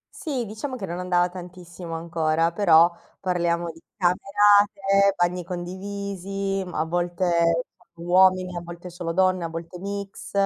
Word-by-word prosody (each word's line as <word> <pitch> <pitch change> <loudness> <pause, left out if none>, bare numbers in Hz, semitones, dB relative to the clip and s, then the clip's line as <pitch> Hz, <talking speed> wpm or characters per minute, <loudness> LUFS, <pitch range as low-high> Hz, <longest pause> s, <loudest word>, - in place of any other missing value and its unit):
Sì, 265 -7 -3
diciamo 220 +6 -5
che 200 -6 -5
non 170 +1 -4
andava 180 -1 +1
tantissimo 175 -1 -9
ancora, 165 0 0
però 170 -2 +5 0.3
parliamo 175 -2 0
di 165 - -17 0.2
camerate, 200 +1 +3
bagni 175 0 0
condivisi, 195 +2 -4
mh, 180 - -9
a 155 - 0
volte 170 -1 +1 0.3
solo 170 +1 -10
uomini, 185 0 +4
a 175 - -4
volte 175 +1 -9
solo 170 -1 -5
donne, 185 -1 +2
a 165 - -3
volte 165 +2 -7
mix. 200 0 -6
180 Hz, 145 wpm, -24 LUFS, 170-195 Hz, 0.3 s, però